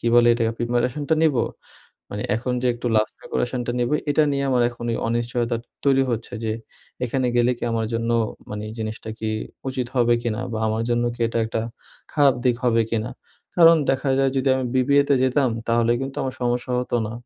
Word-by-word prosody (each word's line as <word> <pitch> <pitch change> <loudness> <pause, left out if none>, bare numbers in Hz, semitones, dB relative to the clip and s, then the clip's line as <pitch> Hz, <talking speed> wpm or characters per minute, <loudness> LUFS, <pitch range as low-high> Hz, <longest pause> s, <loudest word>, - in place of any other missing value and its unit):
কি - - -4
বলে 120 0 +6
এটা 120 - -1 0.2
প্রিপারেশনটা 125 +6 0
নিবো 135 -7 +3 0.7
মানে - - -4
এখন 125 +2 -2
যে - - +1
একটু 120 +1 -6
লাস্ট 110 0 +1
ডেকোরেশন 125 +1 -2
টা - - -1
নেবো 120 +4 +1 0.2
এটা 150 +2 +4
নিয়ে 140 0 0
আমার 125 -2 +3
এখন 120 -1 -9 0.2
অনিশ্চয়তাটা 120 0 -1 0.3
তৈরি 135 -1 +4
হচ্ছে। 115 -2 -3
যে 110 - 0 0.5
এখানে 130 +1 0
গেলে 120 +1 +4
কি - - -4
আমার 115 -1 0
জন্য 115 0 -1 0.4
মানে 105 0 -4
জিনিসটা 110 0 -5
কি 110 - -2 0.4
উচিত 130 -1 -2
হবে 120 -1 +4
কিনা, 115 -2 -2
বা 110 - -2
আমার 110 +1 -1
জন্য 120 0 +2
কি 120 - -16
এটা 115 - -2
একটা 110 - -2 0.5
খারাপ 145 -3 +4
দিক 125 -2 +3
হবে 115 -2 +3
কিনা। 115 +1 -1 0.5
কারণ 165 -1 +8
দেখা 135 +1 0
যায় 135 0 +3
যদি 135 +1 +1
আমি 130 - -1
বিবিএতে 140 +2 +4
যেতাম 130 0 +2 0.2
তাহলে 115 0 +3
কিন্তু 135 0 -5
আমার 130 -1 -3
সমস্যা 120 +1 -1
হত 125 - -4
না। 110 - -6
120 Hz, 190 wpm, -23 LUFS, 115-130 Hz, 0.7 s, কারণ